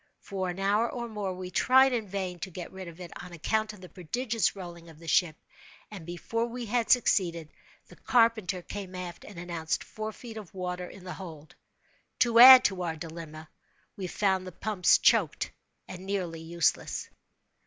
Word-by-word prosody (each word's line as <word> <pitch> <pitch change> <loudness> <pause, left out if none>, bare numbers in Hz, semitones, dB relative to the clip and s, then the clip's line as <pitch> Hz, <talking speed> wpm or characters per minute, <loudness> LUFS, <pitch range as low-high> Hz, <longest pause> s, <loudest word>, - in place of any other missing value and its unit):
For 190 -2 -4
an 175 - -5
hour 205 +4 +2
or 240 -1 -4
more, 210 -4 -4
we 180 0 -7
tried 260 +6 +5
in 225 -4 -2
vain 185 -2 -4
to 190 - -5
get 175 -1 -8
rid 190 -1 -8
of 170 +1 -11
it, 175 -2 -8
on 180 0 -10
account 215 +6 -1
of 210 -3 -14
the 180 - -11
prodigious 225 +4 -1
rolling 170 -3 -9
of 160 - -14
the 165 +1 -13
ship; 160 -1 +3 0.6
and, 185 -6 -9
before 230 +7 -2
we 240 0 -6
had 230 +1 0
succeeded, 170 -9 +2 0.3
the - - -16
carpenter 220 -7 +2
came 190 -1 -7
aft 180 -1 -7
and 205 - -12
announced 170 -2 -3
four 215 0 -6
feet 225 0 -10
of 200 -4 -10
water 180 -1 -4
in 190 - -13
the 180 - -6
hold. 160 -5 -10 0.7
To 235 -1 +5
add 255 +1 +12
to 190 -2 0
our 165 -2 -2
dilemma, 160 -1 -9 0.5
we 190 -2 -5
found 190 0 0
the - - -6
pumps 200 0 +3
choked - - +2 0.4
and 185 +1 -9
nearly 180 -5 -3
useless. 170 +1 -1
185 Hz, 185 wpm, -29 LUFS, 175-215 Hz, 0.7 s, add